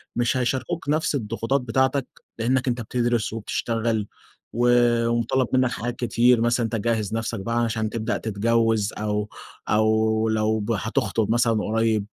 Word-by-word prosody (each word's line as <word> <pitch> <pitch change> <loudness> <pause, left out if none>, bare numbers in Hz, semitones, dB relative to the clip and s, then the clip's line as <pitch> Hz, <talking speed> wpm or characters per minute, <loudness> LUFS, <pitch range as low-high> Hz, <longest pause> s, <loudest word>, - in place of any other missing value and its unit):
مش 120 +1 +1
هيشاركوك 130 +5 -2
نفس 155 -1 +1
الضغوطات 115 +3 -1
بتاعتك، 130 +2 0 0.3
لأنك 130 +3 +1
أنت 120 0 0
بتدرس 120 -2 -1
وبتشتغل 115 -1 -2 0.5
و 120 +2 +1 0.4
ومُطالَب 120 +2 +1
منك 130 -1 +3
حاجات 120 +1 -4
كتير، 120 0 +3
مثلًا 120 0 +2
إن - - -3
أنت - - +2
تجهّز 110 -3 -1
نفسك 115 -1 -2
بقى 115 +4 -3
عشان 110 -1 -1
تبدأ 115 +1 -2
تتجوز، 110 0 +1
أو 105 0 -2 0.4
أو 110 +1 +2
لو 110 -1 0
هتخطب 110 0 -1
مثلًا 115 -1 +3
قريب. 110 -1 +1
115 Hz, 145 wpm, -24 LUFS, 110-120 Hz, 0.5 s, منك